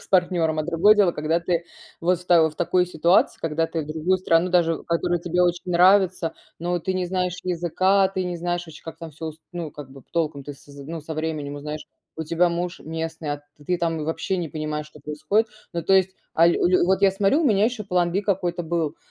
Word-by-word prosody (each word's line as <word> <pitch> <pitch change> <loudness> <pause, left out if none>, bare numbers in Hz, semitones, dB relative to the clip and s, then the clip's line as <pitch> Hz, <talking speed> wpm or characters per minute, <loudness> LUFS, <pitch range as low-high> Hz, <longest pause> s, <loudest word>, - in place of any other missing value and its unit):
с - - -16
партнёром, 175 -4 +2
а 155 - +1
другое 175 +6 +4
дело, 200 -5 +3
когда 155 +2 0
ты 170 0 -1 0.4
вот 175 +1 +2
в 180 - -14
та 165 -3 +5
в 155 - -11
такой 180 +1 +2
ситуации, 170 +1 +2
когда 165 0 0
ты 165 -1 -3
в 145 - -10
другую 160 +4 0
страну 175 -1 +2
даже, 165 -2 +2
которая 170 +1 0
тебе 175 +1 +1
очень 175 +1 0
нравится, 180 -1 +4 0.3
но 175 +1 -1
ты 185 +3 -3
не 185 -1 0
знаешь 180 -1 -1
языка, 185 +2 +2
ты 190 -1 -3
не 175 -1 -3
знаешь 175 +1 -2
ваще, 160 -2 -12
как 165 - -8
там 165 -1 -8
всё 160 +2 -7
ус 155 -1 -6 0.2
ну, 170 -3 -5
как 145 -2 -10
бы 135 0 -12
п - - -43
толком 155 -4 -1
ты 145 0 -7
с 140 - -20
з 140 -1 -12
ну, 165 0 -5
со 160 +2 -6
временем 155 -2 -3
узнаешь. 150 +1 -6 0.3
У 160 - -3
тебя 170 +3 +2
муж 175 +1 -3
местный, 160 -1 -4
а 145 - -11 0.2
ты 180 - +1
там 165 -2 -1
вообще 165 +4 -2
не 170 -3 -3
понимаешь, 150 -1 -4
что 150 0 -16
происходит. 155 +10 0 0.3
Ну, 170 - -2
то 195 - +1
есть, 190 -1 +4 0.2
а, 165 - +5
ль - - +4
лю 180 0 +3
вот 190 +1 +2
я 195 - +6
сморю, 200 - +2
у - - 0
меня 210 -6 +4
ещё 235 -3 -4
план 180 -2 +1
B 195 - 0
какой-то 180 -3 -1
был, 165 -2 -2
170 Hz, 240 wpm, -24 LUFS, 160-180 Hz, 0.4 s, я